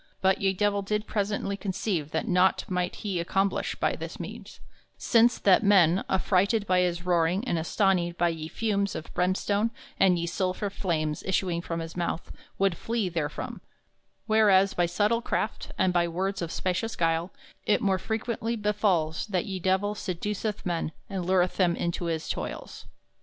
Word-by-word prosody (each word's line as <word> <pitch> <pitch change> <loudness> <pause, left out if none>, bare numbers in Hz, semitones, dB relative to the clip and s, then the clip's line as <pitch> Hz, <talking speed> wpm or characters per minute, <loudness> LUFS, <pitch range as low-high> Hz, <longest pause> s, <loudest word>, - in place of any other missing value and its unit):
But 190 0 +2
ye 195 -1 +3
Divell 205 +1 +1
did 210 +2 -2
presently 200 -1 -1
conceive 190 -5 -2
that - - -2
naught 180 +1 +3
might 180 -1 -1
he 190 -4 -1
accomplish 195 +3 0
by - - 0
this - - -7
means, - - -8 0.4
since 235 +1 +4
that 190 -2 +4
men, 190 -4 +5
affrighted 200 +3 +2
by 185 -2 +3
his 175 -1 0
roaring 180 +5 +1
and 170 - +1
astonied 175 0 +1
by 175 0 +3
ye 160 -2 -4
fumes 200 +1 -1
of 160 - -7
brimstone 200 +4 +1 0.3
and 185 -2 +5
ye 170 - -1
sulphur 185 +3 -2
flames 155 -6 -1
issuing 180 -2 0
from 165 -1 -4
his 165 0 -7
mouth, 170 -1 -3 0.3
wolde 195 -3 +2
flee 225 0 -2
therefrom; 160 -4 -4 0.6
whereas 205 -3 +4
by 175 -1 +1
subtile 210 +6 +1
craft - - -2
and 185 -1 +2
by 175 -1 +3
words 190 +3 -2
of 170 -1 -3
specious 190 +5 -2
guile 165 +1 0 0.4
it 210 - +4
more 190 -2 +1
frequently 225 +2 -2
befalls 205 -7 0
that 185 -4 -1
ye 190 -2 -4
Divell 190 +3 +1
seduceth 210 +2 -3
men 170 -3 -2 0.2
and 185 -3 -3
lureth 185 -1 +2
them 175 -3 +3
into 170 0 -2
his 165 -2 -2
toils. - - -5
185 Hz, 165 wpm, -27 LUFS, 170-205 Hz, 0.6 s, men